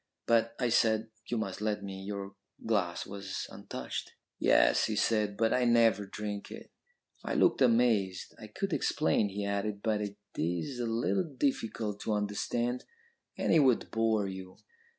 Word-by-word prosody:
"'But,' 115 Hz, 0 st, +2 dB
I 125 Hz, -, +1 dB
said, 110 Hz, -1 st, +2 dB, 0.2 s
'you 120 Hz, -, -1 dB
must 100 Hz, -3 st, -3 dB
let 105 Hz, -1 st, -1 dB
me. 95 Hz, -1 st, -6 dB
Your 100 Hz, 0 st, -5 dB, 0.3 s
glass 100 Hz, -6 st, 0 dB
was 100 Hz, -1 st, -5 dB
untouched.' -, -, -6 dB, 0.3 s
"'Yes,' -, -, +4 dB
he 110 Hz, -, -1 dB
said, 105 Hz, -1 st, +1 dB
'but 115 Hz, -1 st, +2 dB
I 125 Hz, -, +2 dB
never 115 Hz, -4 st, +4 dB
drink 105 Hz, 0 st, -5 dB
it.' -, -, -10 dB, 0.5 s
"I -, -, -2 dB
looked 355 Hz, -, +3 dB
amazed. 115 Hz, -7 st, +2 dB
'I -, -, -9 dB
could -, -, -3 dB
explain,' 90 Hz, +6 st, +2 dB
he 100 Hz, +1 st, -3 dB
added, 100 Hz, 0 st, -2 dB
'but 110 Hz, -2 st, +1 dB
it 100 Hz, -1 st, -4 dB, 0.2 s
is 85 Hz, -, -2 dB
a 120 Hz, -, -1 dB
little 120 Hz, +11 st, +1 dB
difficult 115 Hz, -6 st, -1 dB
to 110 Hz, -, -1 dB
understand, 115 Hz, +4 st, -1 dB, 0.5 s
and -, -, +1 dB
it 165 Hz, -, +6 dB
would 130 Hz, -5 st, +3 dB
bore 110 Hz, -2 st, +1 dB
you.' 95 Hz, -1 st, -8 dB
105 Hz, 160 wpm, -31 LUFS, 100-115 Hz, 0.5 s, it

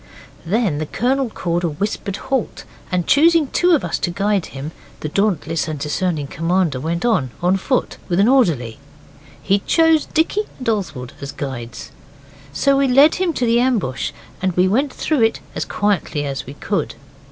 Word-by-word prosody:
Then 195 Hz, -6 st, +1 dB
the 155 Hz, -, -3 dB
Colonel 255 Hz, -, 0 dB
called 175 Hz, -4 st, -2 dB
a 170 Hz, -, +1 dB
whispered 200 Hz, +4 st, -3 dB
halt, 265 Hz, -1 st, -2 dB, 0.3 s
and 180 Hz, -2 st, 0 dB
choosing 330 Hz, +2 st, +5 dB
two 355 Hz, -1 st, +4 dB
of 295 Hz, -, -1 dB
us -, -, -2 dB
to -, -, -1 dB
guide 195 Hz, +1 st, 0 dB
him, 140 Hz, +3 st, -7 dB, 0.3 s
the 155 Hz, -, -3 dB
dauntless 165 Hz, -5 st, 0 dB
and 155 Hz, -1 st, -3 dB
discerning 150 Hz, +1 st, -1 dB
commander 165 Hz, -1 st, 0 dB
went 170 Hz, -, -2 dB
on, 215 Hz, -, +2 dB
on 180 Hz, +2 st, +2 dB
foot, 255 Hz, +6 st, -1 dB
with 175 Hz, +1 st, +1 dB
an 200 Hz, -, +5 dB
orderly. 160 Hz, -, +2 dB, 0.6 s
He 195 Hz, +1 st, +2 dB
chose 325 Hz, +6 st, +3 dB
Dicky 365 Hz, +7 st, +1 dB
and 255 Hz, -, -7 dB
Oswald 160 Hz, -, -2 dB
as 140 Hz, 0 st, -5 dB
guides. 120 Hz, -4 st, -6 dB, 0.6 s
So 275 Hz, -, +2 dB
we 275 Hz, 0 st, +3 dB
led 275 Hz, +5 st, +6 dB
him 365 Hz, -2 st, +2 dB
to 250 Hz, -, 0 dB
the 235 Hz, 0 st, +3 dB
ambush, 225 Hz, -, 0 dB, 0.3 s
and 185 Hz, -1 st, 0 dB
we 180 Hz, +2 st, +3 dB
went 265 Hz, +8 st, +1 dB
through 305 Hz, -6 st, -1 dB
it 225 Hz, 0 st, +2 dB
as -, -, -3 dB
quietly 195 Hz, -8 st, -1 dB
as 135 Hz, -2 st, -4 dB
we 135 Hz, -, -8 dB
could. 200 Hz, +6 st, -2 dB
190 Hz, 175 wpm, -20 LUFS, 155-255 Hz, 0.6 s, led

